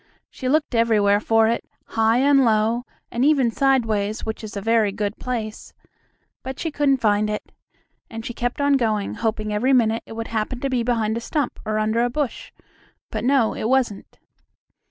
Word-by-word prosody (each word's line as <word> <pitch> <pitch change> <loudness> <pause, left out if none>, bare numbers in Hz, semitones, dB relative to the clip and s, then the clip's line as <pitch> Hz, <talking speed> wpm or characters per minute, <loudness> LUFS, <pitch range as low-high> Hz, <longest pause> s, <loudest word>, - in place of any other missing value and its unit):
She 255 - -4
looked 300 -1 +1
everywhere 215 -3 +3
for 225 +1 +3
it, 230 +1 0 0.3
high 225 +1 +2
and 275 +1 +4
low, 225 +1 +2 0.3
and 235 - 0
even 275 -5 +3
sideways, 225 -5 +1
which 220 0 -5
is 210 -1 -7
a - - -1
very 220 0 +2
good 205 +1 -3
place; 225 -4 -5 0.7
but 265 +1 -6
she 325 - -2
couldn't 285 -2 +2
find 210 -3 +1
it. 210 - -5 0.6
And 225 0 -7
she 240 - -4
kept 245 +3 -3
on 285 -1 +3
going, 215 -5 -1
hoping 215 -2 -2
every 255 +6 +2
minute 225 -3 +3
it - - -9
would 225 0 -5
happen 230 +3 -2
to 275 - -1
be 250 -2 +1
behind 230 -2 0
a - - -4
stump 290 +2 -2
or 215 0 -1
under 215 +2 +1
a 245 - +1
bush. 275 0 -3 0.6
But - - -3
no, 255 -3 +3
it 220 - -3
wasn't. 255 -6 -1
230 Hz, 185 wpm, -22 LUFS, 215-255 Hz, 0.7 s, and